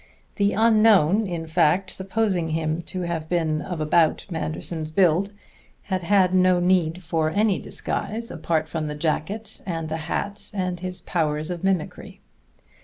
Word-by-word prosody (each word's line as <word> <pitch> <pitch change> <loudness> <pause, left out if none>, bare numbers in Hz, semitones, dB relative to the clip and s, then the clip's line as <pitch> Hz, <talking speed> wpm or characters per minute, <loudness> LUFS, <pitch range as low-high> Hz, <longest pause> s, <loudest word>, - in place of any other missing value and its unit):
The 200 0 +2
unknown, 215 -3 +4
in 170 -3 -4
fact, 175 +3 +2
supposing 190 -3 -1
him 160 +1 -1
to 185 - -4
have 165 -3 -3
been 160 -3 0
of 175 -4 -5
about 155 +1 +2
Manderson's 160 0 -4
build, 180 +3 +2 0.5
had 185 -2 -2
had 185 0 +3
no 185 -1 +4
need 180 -1 +1
for 160 -1 0
any 205 +2 +2
disguise, 230 +2 -4
apart 160 -1 -1
from 155 -1 -3
the 150 - -4
jacket 165 +8 -3
and 165 -4 -4
the 160 - -2
hat 200 +6 -4
and 185 -2 -2
his 180 0 -6
powers 155 -2 -1
of 175 0 -5
mimicry. 190 -5 -2
175 Hz, 150 wpm, -24 LUFS, 160-190 Hz, 0.5 s, unknown